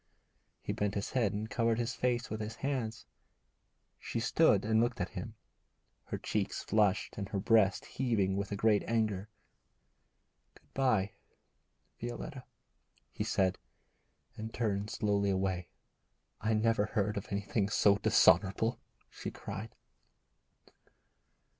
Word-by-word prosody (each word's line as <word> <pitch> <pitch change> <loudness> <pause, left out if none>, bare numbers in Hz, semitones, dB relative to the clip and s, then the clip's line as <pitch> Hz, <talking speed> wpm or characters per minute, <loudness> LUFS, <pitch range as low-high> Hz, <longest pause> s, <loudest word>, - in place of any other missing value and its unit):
He - - -2
bent 105 -1 -1
his 100 - -2
head 115 -6 +2
and 105 +2 -3
covered 115 +1 +1
his 120 +1 -1
face 125 -1 -1
with 110 0 -3
his 110 +2 -5
hands. 125 -5 -3 0.9
She - - -3
stood - - +3
and 110 0 +3
looked 120 0 0
at 90 - -1
him, - - -6 0.7
her - - -4
cheeks 105 -2 -2
flushed 105 -1 +1
and 100 -1 -4
her 100 - -1
breast 100 -1 +3
heaving 110 -7 0
with 100 0 -3
a - - -1
great 105 0 +3
anger. 110 -3 0 1.3
'Good - - -24
bye, 110 -7 +2 0.9
Violetta,' 125 +3 -6 0.7
he - - -3
said, 95 -1 +1 0.8
and 110 +1 -6
turned 105 -3 -1
slowly 100 -2 +1
away. 95 -2 0 0.7
'I 110 +1 +1
never 110 -1 +2
heard 105 -1 0
of 100 - -4
anything 100 0 -1
so 100 -1 +4
dishonourable,' 110 +1 +4 0.3
she - - -5
cried. 100 +3 -6
105 Hz, 130 wpm, -32 LUFS, 100-115 Hz, 1.3 s, so